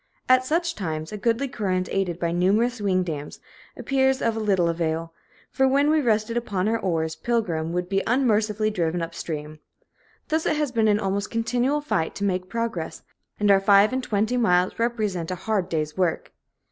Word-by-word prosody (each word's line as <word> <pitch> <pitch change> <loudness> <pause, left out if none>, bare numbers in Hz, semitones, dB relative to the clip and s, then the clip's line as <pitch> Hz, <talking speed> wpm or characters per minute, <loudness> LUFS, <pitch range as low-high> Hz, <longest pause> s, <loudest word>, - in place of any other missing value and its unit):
At 255 0 +5
such 335 +5 0
times 160 - -4
a - - -5
goodly 230 +5 0
current, 190 -8 -2
aided 180 -3 -1
by 170 -1 -1
numerous 210 +7 +1
wing 185 -2 +1
dams, 150 -4 -6 0.4
appears 265 -1 +1
of 230 -1 0
little 200 -6 +1
avail; 165 0 -2 0.4
for, 265 - +2
when 280 +3 +3
we 310 -1 +3
rested 225 -2 +1
upon 200 -5 -1
our 225 +1 +1
oars, 160 -4 -1
Pilgrim 175 -10 -1
would 180 +1 -2
be 195 +1 0
unmercifully 215 -4 +1
driven 170 -3 -1
up 165 0 -6
stream. 155 -2 -6 0.7
Thus 315 +1 0
it - - +2
has 300 -3 -1
been 225 -3 +2
an 210 0 +3
almost 200 0 -2
continual 245 +5 0
fight 165 - -1
to 200 - -4
make 185 -2 -1
progress, 230 -8 -4 0.4
and 205 -1 +4
our 195 -1 +5
five 200 +3 +5
and 260 - 0
twenty 220 +1 0
miles 180 -5 +2
represent 215 -8 -1
a 185 - -2
hard 190 -1 -2
day's 155 -2 -2
work. 180 -3 -1
205 Hz, 185 wpm, -24 LUFS, 175-235 Hz, 0.7 s, At